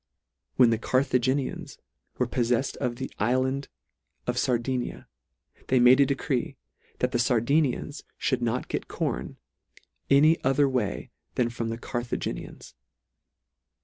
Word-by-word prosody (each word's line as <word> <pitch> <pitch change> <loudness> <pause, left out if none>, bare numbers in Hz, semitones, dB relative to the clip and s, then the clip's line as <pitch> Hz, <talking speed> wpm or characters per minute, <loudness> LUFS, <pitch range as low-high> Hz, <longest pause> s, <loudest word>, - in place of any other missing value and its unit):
When 125 -3 +6
the 115 - +1
Carthaginians 130 +1 0 0.4
were 125 - +2
poflefled 120 +1 0
of 125 -3 -2
the 130 +2 -6
ifland 130 +5 +1 0.6
of - - -1
Sardinia, 125 0 -1 0.6
they 130 - +3
made 125 +2 +7
a 140 - +5
decree, 135 -2 -1 0.4
that 125 - 0
the 120 - 0
Sardinians 135 +4 +1 0.3
mould 130 -2 +1
not 120 +1 -1
get - - -3
corn, - - -3 0.7
any 155 +4 +5
other 135 +2 +3
way 125 -7 -2 0.2
than 120 -2 +1
from 115 -1 -3
the 115 - -3
Carthaginians. 120 0 -5
125 Hz, 120 wpm, -27 LUFS, 120-135 Hz, 0.7 s, made